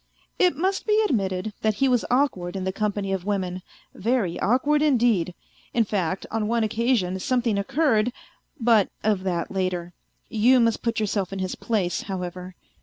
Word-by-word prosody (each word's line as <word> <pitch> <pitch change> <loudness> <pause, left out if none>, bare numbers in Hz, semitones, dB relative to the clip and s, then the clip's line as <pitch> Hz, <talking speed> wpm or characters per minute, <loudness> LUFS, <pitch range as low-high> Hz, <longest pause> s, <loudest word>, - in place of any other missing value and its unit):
It 360 -5 +4
must 380 +6 -1
be 425 0 +4
admitted 195 - -1
that 215 -1 +1
he 270 +6 +2
was 250 -3 +2
awkward 240 -10 +1
in 190 - -3
the 190 - -1
company 205 -1 -1
of 190 -2 -2
women, 185 -2 -2 0.3
very 220 -5 0
awkward 275 +8 +2
indeed, 235 - +2 0.4
in 235 - +4
fact 190 -3 -2
on 220 -1 -1
one 230 0 +1
occasion 220 -4 0
something 245 0 0
occurred... 245 -1 +2 0.5
but 225 -4 +4
of 210 -3 +1
that 175 -3 -2
later. 180 -2 -2 0.3
You 245 +3 +4
must 230 -1 +2
put 230 -1 -1
yourself 200 -3 -1
in 195 - -4
his 185 -1 -2
place, 200 -7 -1
however. 180 -1 -6
210 Hz, 165 wpm, -24 LUFS, 185-240 Hz, 0.5 s, It